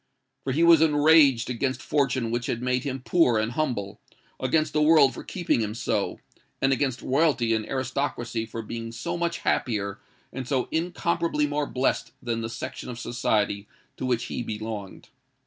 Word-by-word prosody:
For 135 - -2
he 155 +6 +2
was 170 -2 +7
enraged 150 -5 +5
against 130 +2 -1
fortune 130 -5 0
who 120 - +1
had 120 +1 -2
made 125 0 0
him 135 -2 -4
poor 165 -10 +4
and 110 +1 0
humble—against 130 +3 -2
the 150 - +2
world 150 -3 +6
for - - -8
keeping 175 -9 0
him 105 0 -3
so—and 135 +3 -2
against 130 -1 -1
royalty 135 -5 +2
and 110 -1 -1
aristocracy 130 -3 -2
for 115 0 -6
being 115 +1 -6
so 170 +9 -4
much 170 0 -2
happier 100 -5 -1 0.3
and 130 -1 -5
so 130 -2 0
incomparably 170 -2 0
more 145 0 -1
blessed 130 +1 -1
than 115 -2 -2
the 115 - -3
section 115 - -6
of 120 - -6
society 110 -4 -1 0.3
to - - -6
which 120 -2 +1
he - - -4
belonged. 110 -3 -6
130 Hz, 165 wpm, -26 LUFS, 115-150 Hz, 0.3 s, was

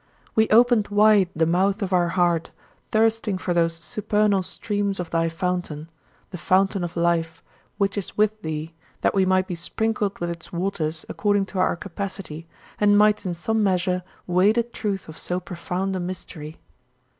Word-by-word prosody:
We 220 0 +3
opened 235 -1 +5
wide 205 -2 +4
the 160 +1 +2
mouth 190 +5 +1
of 190 -1 -2
our 175 -1 +3
heart, 170 -2 +1 0.4
thirsting 220 -2 +2
for 185 -1 -2
those 165 -1 +2
supernal 205 +4 +1
streams 200 +1 -2
of 175 -2 -4
thy 165 0 +1
fountain, 165 -2 -3 0.4
"the 180 - -6
fountain 190 +2 +2
of 175 0 -5
life" 165 -1 0 0.3
which 200 0 0
is 195 - -6
with 215 0 +2
thee, 160 +1 -4 0.3
that - - +2
we 190 -1 +2
might 185 0 +3
be 185 - -5
sprinkled 205 +4 -1
with 175 0 -3
its 170 -1 -9
waters 170 -3 -2
according 205 -1 +1
to 190 - -2
our 185 - +2
capacity 175 -3 -6 0.3
and 205 0 +5
might 210 -1 +3
in 175 - -2
some 220 +6 0
measure 180 -2 +1 0.2
weigh 185 +3 +4
the 235 +1 +2
truth 210 -4 -4
of 160 - -9
so 180 +1 -2
profound 185 +2 -3
a - - -2
mystery. 175 -4 -7
185 Hz, 170 wpm, -24 LUFS, 170-205 Hz, 0.4 s, opened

